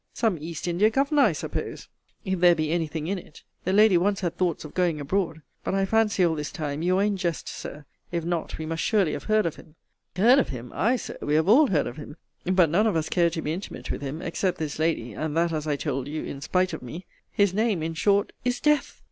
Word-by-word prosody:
Some 215 -8 +1
East 165 +2 -5
India 180 +5 +3
governor, 280 +5 +2
I 230 -8 +5
suppose, 155 - -5 0.4
if 190 -2 -1
there 175 -1 +6
be 155 -1 -1
any 165 -1 0
thing 155 0 -5
in 190 +3 -1
it. 160 - -15 0.2
The 185 - +1
lady 205 -2 +6
once 200 +2 +1
had 175 -2 -2
thoughts 175 -4 -1
of 150 - -10
going 175 -4 +1
abroad. 160 +1 -2 0.2
But - - -1
I 195 0 +2
fancy 210 -2 +2
all 165 - +2
this 150 -2 -4
time 150 -1 -4
you 180 +2 +2
are 195 - +3
in 205 -1 +1
jest, 170 -3 -2
Sir. 150 0 -7 0.3
If 170 -2 -2
not, 170 -2 -2
we 160 - -5
must 165 +1 -3
surely 200 -7 +2
have - - -5
heard 215 -1 +2
of 165 - -2
him 155 - -16 0.4
Heard 235 +9 +6
of - - 0
him! 125 -2 -7
Aye, 235 +5 +2
Sir, 245 - -6
we 150 - 0
have 160 +2 +2
all 275 +9 +6
heard 160 - +1
of 120 - -6
him 150 +1 -9 0.3
But 180 -4 +3
none 210 +7 +3
of 210 - +1
us 160 -1 0
care 170 -1 +3
to 160 -1 -4
be 155 - -1
intimate 185 +4 -6
with - - -4
him 145 +5 -5
except 180 +2 -1
this 155 -1 -4
lady 155 -8 0
and 155 +7 -3
that, 170 0 +2
as 155 -1 -3
I 150 - +1
told 135 -2 -3
you, 155 +1 -4
in 140 - -6
spite 185 +4 +1
of - - -5
me 155 +9 -8 0.3
his 200 -2 +2
name, 210 -5 +1
in 165 +1 -2
short, 200 +4 +2
is 245 0 0
DEATH! 300 -2 +1
170 Hz, 255 wpm, -26 LUFS, 155-200 Hz, 0.4 s, there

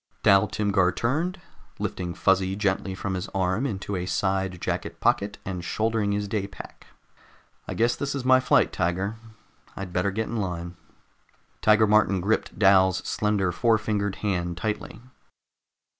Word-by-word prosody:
Dal 100 +2 +5
Timgar 100 -4 +1
turned, 160 - -1 0.4
lifting 90 -2 -4
Fuzzy 95 +1 +2
gently 95 -1 -1
from 100 0 -3
his 90 -1 -3
arm 95 +7 +1
into 100 -3 -4
a 90 0 -3
side 95 -2 -1
jacket - - -3
pocket 100 +1 +1
and 90 -2 -4
shouldering 110 +1 0
his 105 0 -1
day 100 -1 -2
pack. 100 - -12 0.8
"I - - -4
guess 120 +1 +2
this 140 0 -3
is 135 -2 -4
my 130 0 +6
flight, 130 - +3
Tiger. 95 +6 -1 0.6
I'd 95 -2 -6
better 90 +2 +1
get 110 +3 -2
in 115 - -4
line." 90 -3 -4 0.9
Tiger 110 0 +5
Martin 105 -2 +3
gripped 105 +5 -1
Dal's 95 -2 +4
slender 105 -4 0
four 115 +4 +3
fingered 105 -2 -2
hand 90 -3 -1
tightly. 105 +3 -4
100 Hz, 150 wpm, -25 LUFS, 95-110 Hz, 0.9 s, my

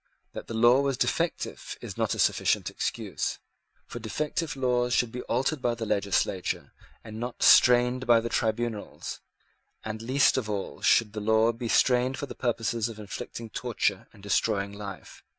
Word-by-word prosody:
That - - -7
the 115 - -5
law 120 +4 +5
was 140 -2 0
defective - - -2
is - - -8
not - - 0
a - - -8
sufficient - - +1
excuse: - - -3 0.5
for 120 - -8
defective 150 +7 -3
laws 125 -2 +1
should 120 -1 +1
be 125 - -5
altered 130 +4 0
by 120 -2 0
the 115 -1 -4
legislature, 100 -3 -1 0.3
and 110 -1 -8
not 120 +1 -4
strained 125 +1 +5
by 120 -1 +6
the 115 - -3
tribunals; 115 -2 -3 0.6
and 110 0 -5
least 135 +5 +3
of 115 -5 -2
all 100 -2 -4
should 110 -3 +3
the 105 - -4
law 110 +2 +3
be 120 +1 -6
strained 125 +2 +3
for - - -4
the - - -8
purpose 115 -3 -1
of 115 -2 -8
inflicting 110 +2 -7
torture - - -1
and 100 - -18
destroying 100 0 0
life. 100 -3 -9
115 Hz, 170 wpm, -27 LUFS, 110-125 Hz, 0.6 s, by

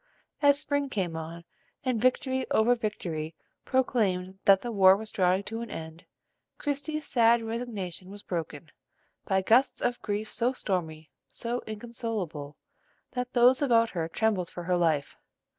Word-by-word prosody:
As 285 -1 +6
spring 285 -1 0
came 185 -8 -2
on, 165 +1 -6 0.4
and 250 -4 0
victory 260 +1 +1
after 225 +3 +4
victory 170 -9 -4 0.3
proclaimed 195 -8 0
that 195 -1 +6
the 240 - -3
war 190 -2 +6
was 220 +1 -7
drawing 185 +1 +2
to 225 +3 -5
an 235 - -6
end, 160 +1 -8 0.5
Christie's 290 +1 -3
sad 235 -1 +4
resignation 220 -6 -5
was 205 +1 -10
broken, 160 -3 -5 0.5
by 190 -1 +1
gusts 245 +7 +4
of 245 0 -1
grief 210 +1 -3
so 245 +2 +1
stormy, 160 -9 -3 0.2
so 240 +1 -4
inconsolable, 210 - -5 0.5
that 250 -1 -4
those 250 +2 +5
about 230 -5 +3
her 165 -3 -2
trembled 190 0 0
for 175 - -7
her 180 +1 +1
life. 160 -5 0
215 Hz, 145 wpm, -28 LUFS, 175-245 Hz, 0.5 s, As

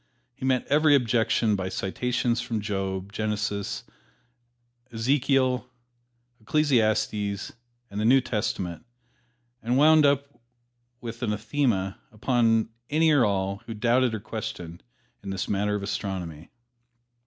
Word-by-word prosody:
He 130 - -7
met 130 -1 +1
every 150 0 +4
objection 115 -3 +2
by 95 -1 -3
citations 120 +5 -1
from 115 -2 -3
Job, 95 -1 -3
Genesis, 105 -1 -2 1.1
Ezekiel, 130 +1 +1 0.7
Ecclesiastes 110 -6 +1 0.4
and 100 - -4
the - - 0
New 130 +4 +6
Testament, 105 -8 -3 0.8
and 120 +2 0
wound 155 +2 +6
up 140 -1 -1 0.6
with 115 0 -7
an 120 - -1
anathema 105 -2 -1
upon 115 0 +2 0.2
any 160 +1 +3
or 145 -4 +5
all 100 0 -1
who 115 - -5
doubted 120 +2 +2
or - - -4
questioned 100 -6 -6 0.4
in 100 - -7
this 95 -1 -3
matter 105 +1 0
of 100 - -3
astronomy. 90 -5 -4
110 Hz, 120 wpm, -26 LUFS, 100-125 Hz, 1.1 s, New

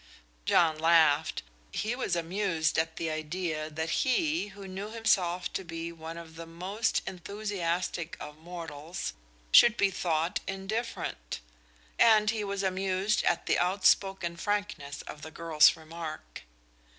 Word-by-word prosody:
John 160 -3 +4
laughed. 160 -2 +4 0.3
He 220 +3 -1
was 255 - -1
amused 170 -2 0
at 160 0 -1
the 165 -1 -2
idea 155 0 -3
that 160 +1 -3
he, 300 - +1
who 200 -1 -10
knew 195 +3 -5
himself 185 -6 +1
to 190 - -2
be 165 -1 -5
one 165 0 -8
of 165 -1 -10
the 165 0 -7
most 190 +7 -1
enthusiastic 180 -3 -3
of 150 +1 -9
mortals, 165 0 -6 0.4
should 235 -1 +8
be 200 -1 +3
thought 170 0 0
indifferent; 195 - -4 0.6
and 215 -2 +6
he 220 -2 -2
was 200 -1 -2
amused 190 +2 +1
at 170 - +1
the - - +2
outspoken 190 -1 +2
frankness 205 -8 -3
of 150 - -9
the 160 - -7
girl's 160 -1 +4
remark. 160 - -8
175 Hz, 135 wpm, -29 LUFS, 160-200 Hz, 0.6 s, should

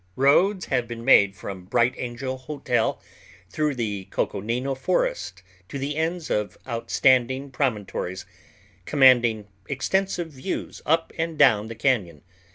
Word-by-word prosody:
Roads 175 +8 +3
have 125 -3 -1
been 115 0 -7
made 100 -7 +6
from 95 0 -8
Bright 120 +5 +2
Angel 130 +2 -4
Hotel 130 -3 -1 0.5
through 150 +2 0
the 105 -5 -3
Coconino 120 +7 -2
Forest 95 - -2 0.3
to 140 - -5
the 140 +2 -3
ends 165 +1 -2
of 105 -1 -1
outstanding 130 +3 +1
promontories, 105 -8 -2 0.6
commanding 120 -6 +4 0.2
extensive 175 +4 -1
views 140 +7 -5
up 165 +1 +1
and 165 -1 -2
down 110 -7 +4
the 115 - -7
cañon. 110 - 0
130 Hz, 125 wpm, -24 LUFS, 110-145 Hz, 0.6 s, made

